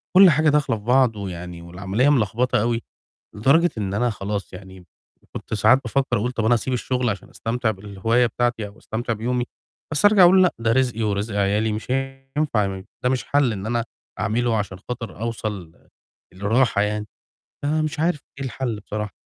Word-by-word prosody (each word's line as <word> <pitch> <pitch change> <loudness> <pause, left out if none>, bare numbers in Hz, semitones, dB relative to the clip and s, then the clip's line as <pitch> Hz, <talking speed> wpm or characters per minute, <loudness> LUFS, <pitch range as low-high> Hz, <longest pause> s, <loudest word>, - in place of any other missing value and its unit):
كلّ 190 0 +9
حاجة 155 0 +3
داخلة 145 -6 +2
في 105 - -13
بعض 125 0 +3
ويعني 90 -4 -6
والعملية 95 +9 0
ملخبطة 120 -2 +2
أوي، 115 +1 0 0.5
لدرجة 140 +11 +4
إن 100 -2 -2
أنا 120 +3 +1
خلاص 100 -1 -4
يعني 95 0 -11
م - - -18 0.4
وكنت - - -7
ساعات 110 +5 +5
بافكّر 130 +1 0
أقول 120 +4 -1
طَب 115 -3 -2
أنا 115 +2 +4
هاسيب 120 +3 -1
الشُغل 125 -1 0
عشان 100 - -6
أستمتع 115 0 -1
بالهواية 105 +4 0
بتاعتي 120 -1 -1
أو 100 +2 -14
أستمتع 115 +2 -3
بيومي، 120 +3 -1 0.5
بس 150 - +1
أرجع 205 -2 +7
أقول 185 +2 +7
لأ، 180 - +4
ده 115 0 +1
رزقي 125 -3 +1
ورزق 105 +1 -1
عيالي 105 +2 +1
مش 110 +3 -5
هينفع 135 -3 -1
م 95 -1 -5 0.2
ده 125 - +4
مش 130 -1 0
حَل 140 -5 +2
إن 100 0 -5
أنا 120 0 0 0.4
أعمله 115 +2 +1
عشان 100 -2 -4
خاطر 115 -5 -6
أوصل 105 -7 -4 0.6
لراحة 105 +3 +2
يعني، 105 0 -2 0.6
أنا 155 +2 +1
مش 155 0 -3
عارف 165 -1 +1 0.2
إيه 135 - -3
الحَل 120 -3 -3
بصراحة. 105 0 -5
115 Hz, 180 wpm, -23 LUFS, 105-130 Hz, 0.6 s, كلّ